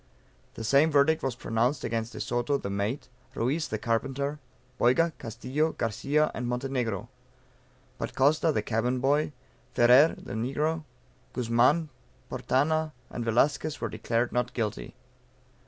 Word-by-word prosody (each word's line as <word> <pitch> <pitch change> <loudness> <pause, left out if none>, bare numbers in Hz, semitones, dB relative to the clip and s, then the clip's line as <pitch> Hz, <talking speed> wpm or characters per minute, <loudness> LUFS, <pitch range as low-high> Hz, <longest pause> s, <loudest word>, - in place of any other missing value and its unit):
The - - -6
same 140 +7 +4
verdict 150 +2 +3
was 130 -3 -2
pronounced 120 +4 0
against 115 0 -2
De - - -7
Soto 120 +4 0
(the 100 - -5
mate) 100 +7 -2 0.3
Ruiz, 145 +7 0
(the 110 - -2
carpenter,) 135 +6 -1 0.4
Boyga, 160 +7 +3
Castillo, 130 +8 -2
Garcia 140 +7 0
and 125 0 -3
Montenegro. 125 -4 -2 0.9
But - - -4
Costa, 155 +4 +3
(the 105 -8 -1
cabin 120 +3 0
boy,) 145 +4 +2 0.4
Ferrer 125 +7 +6
(the - - -8
negro,) 150 +8 -1 0.5
Guzman, 125 +7 +2 0.4
Portana, 155 +3 +1 0.2
and 120 - -4
Velasquez, 145 +7 +1
were 115 - -2
declared 115 +3 -1
NOT 125 +1 -1
GUILTY. 105 - -3
125 Hz, 130 wpm, -28 LUFS, 115-150 Hz, 0.9 s, Ferrer